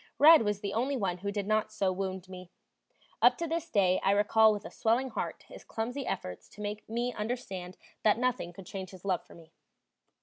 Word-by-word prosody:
"Red" 320 0 +9
was 210 -2 -1
the 200 -2 -3
only 265 +5 0
one 185 -5 -1
who 200 +2 -3
did 200 -1 -2
not 215 +1 +1
so 195 -3 0
wound 190 0 -4
me; 185 -1 -10 0.7
up - - +6
to 335 - -2
this 330 +1 -3
day 185 -5 +3
I - - +2
recall 210 +2 +5
with 205 0 -4
a - - -7
swelling 245 +4 +1
heart - - -4
his - - -12
clumsy 245 +4 -4
efforts 90 -1 -5
to - - -17
make 210 +1 -5
me 240 +2 -1
understand 195 -5 -5 0.2
that 215 0 +4
nothing 245 -8 -1
could 180 +2 -11
change 190 0 -6
his 185 0 -13
love 185 -3 0
for - - -16
me. 165 -1 -16
205 Hz, 210 wpm, -30 LUFS, 185-235 Hz, 0.7 s, Red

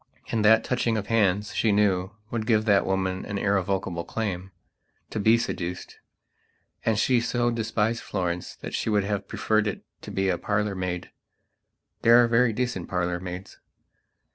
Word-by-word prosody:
And 110 -2 +1
that 110 +1 +6
touching 120 -3 0
of 105 - -3
hands, 105 -2 +2
she 110 - +2
knew, 95 -3 +2 0.2
would 110 -2 -2
give 110 -2 +3
that 100 -3 +3
woman 95 -1 -1
an 100 - -4
irrevocable 95 -3 0
claimto 95 -1 -3 0.7
be 110 +3 +5
seduced. 90 -5 -4 0.8
And 110 -2 +1
she 120 +1 +3
so 120 0 0
despised 115 0 -1
Florence 90 -3 -3
that - - -8
she - - -1
would 105 -2 +2
have 100 -1 -2
preferred 110 -1 +1
it 105 - -4 0.2
to - - -9
be 95 0 0
a 90 - 0
parlour 105 0 0
maid. 90 -2 -4 0.9
There 115 +1 +7
are - - +3
very 115 +1 +3
decent 115 -5 -3
parlour 90 -1 -1
maids. 90 +1 -8
105 Hz, 160 wpm, -26 LUFS, 95-110 Hz, 0.9 s, There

